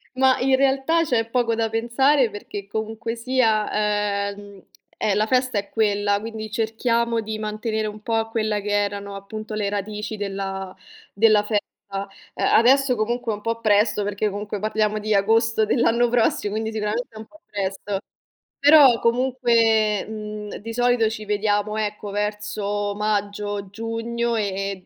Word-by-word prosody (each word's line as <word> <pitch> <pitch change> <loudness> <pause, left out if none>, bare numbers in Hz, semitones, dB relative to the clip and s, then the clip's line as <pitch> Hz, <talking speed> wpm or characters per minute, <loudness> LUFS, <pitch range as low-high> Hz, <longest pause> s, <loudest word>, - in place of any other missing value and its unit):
mah, 260 0 +4
in 265 +1 +4
realtà, 275 +5 +2
c'è 235 -7 0
poco 235 -1 +1
da 225 0 0
pensare 240 +4 +2
perché, 205 -1 -8
comunque 220 +2 -4
sia, 230 -3 +1 0.6
ehm, 200 -1 -13 0.3
eh, 205 - +1
la 210 +1 +2
festa 255 0 +1
è 200 0 -3
quella, 205 -2 +1
quindi 220 0 -6
cerchiamo 230 +1 0
di 215 0 -5
mantenere 215 0 -2
un 210 0 -8
po' 225 0 0
quelle 215 -2 -1
che 205 - -5
erano, 200 -1 -1
appunto, 215 +2 -7
le 205 -2 -1
radici 210 +1 -4
della 195 -1 -4 0.4
della 215 0 +5
festa. 210 -1 0 0.3
A 195 0 -4 0.5
adesso, 260 +2 +4
comunque, 230 +1 -1
è - - -2
un 205 - -11
po' 230 +1 -2
presto, 210 -1 +2
perché, 205 +1 -1
comunque, 205 +1 -5
parliamo 215 0 0
di 215 0 -1
agosto 225 +2 +3
dell'anno 235 +1 +2
prossimo, 225 -3 +1
quindi 220 +1 -2
sicuramente 220 +2 -2
è - - -9
un 220 - -8
po' 315 +7 -20
presto. 195 0 -3 0.6
Però, 280 -5 +7
comunque, 230 -4 +2
mhmm, 210 -1 -6
di 230 +3 -7
solito 245 -2 +2
ci 215 -1 -6
vediamo, 210 0 0
ecco, 210 -1 -3
verso 205 0 -2
maggio, 205 -1 -2
giugno 230 +2 -2
e 195 -3 -3
215 Hz, 150 wpm, -23 LUFS, 205-230 Hz, 0.6 s, Però